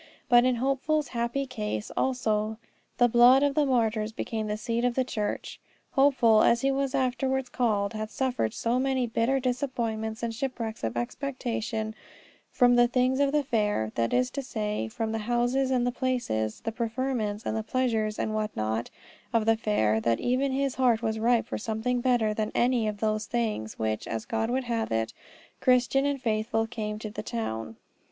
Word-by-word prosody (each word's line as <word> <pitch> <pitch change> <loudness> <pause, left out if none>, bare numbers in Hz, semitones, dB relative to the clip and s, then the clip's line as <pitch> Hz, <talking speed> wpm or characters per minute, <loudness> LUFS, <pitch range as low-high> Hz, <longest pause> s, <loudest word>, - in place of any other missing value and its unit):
But 240 0 +6
in 255 -1 +3
Hopeful's 275 +4 0
happy 235 +3 -1
case 105 - -4
also 220 -4 0 0.4
the 245 - +5
blood 245 +3 +6
of 285 -1 +2
the 295 -1 +2
martyrs 225 -4 +1
became 220 0 -3
the 210 0 -2
seed 230 +2 -2
of 245 -1 +1
the 260 - +2
church. 215 -4 -4 0.3
Hopeful, 260 -6 +4
as 235 0 +4
he 275 - +2
was 275 0 -1
afterwards 260 0 0
called, 210 -5 0
had 215 0 -4
suffered 250 - -1
so 235 +2 0
many 260 -1 +1
bitter 235 +3 +1
disappointments 240 -4 -2
and 230 -1 -1
shipwrecks 230 - -4
of 115 +1 -2
expectation 225 - -3 0.6
from 245 -1 +4
the 240 0 +6
things 255 +2 +1
of 280 -1 +3
the 295 0 +2
fair, 210 - 0
that 115 0 0
is 250 0 +1
to 280 - -3
say, 210 - -3
from 220 - -3
the 225 - -2
houses, 245 +4 +1
the 245 -1 +1
places, 240 - -2
the 225 - -3
preferments, 230 -2 -2
the 220 0 -1
pleasures 220 -2 0
and 215 - -2
what 215 0 -1
not, 110 +2 -1 0.4
of 230 -2 +2
the 225 0 +4
fair, 110 - +1
that 115 0 +1
even 260 +2 +1
his 275 0 0
heart 240 -3 +2
was 220 -1 -1
ripe 235 +1 +3
for - - -4
something 225 +3 -1
better 240 -4 +2
than 215 0 -2
any 240 -2 +2
of 210 -1 -4
those 215 0 0
things, 220 - -2
when, 110 -1 -1
as 110 -1 -4
God 225 0 -1
would 260 +2 0
have 230 -2 -2
it, 115 0 -1 0.5
Christian 255 +2 +3
and 285 -1 -1
Faithful 225 -1 0
came 215 -2 -4
to 215 -1 -6
the 210 - -5
town. 110 - -4
235 Hz, 180 wpm, -27 LUFS, 215-255 Hz, 0.6 s, But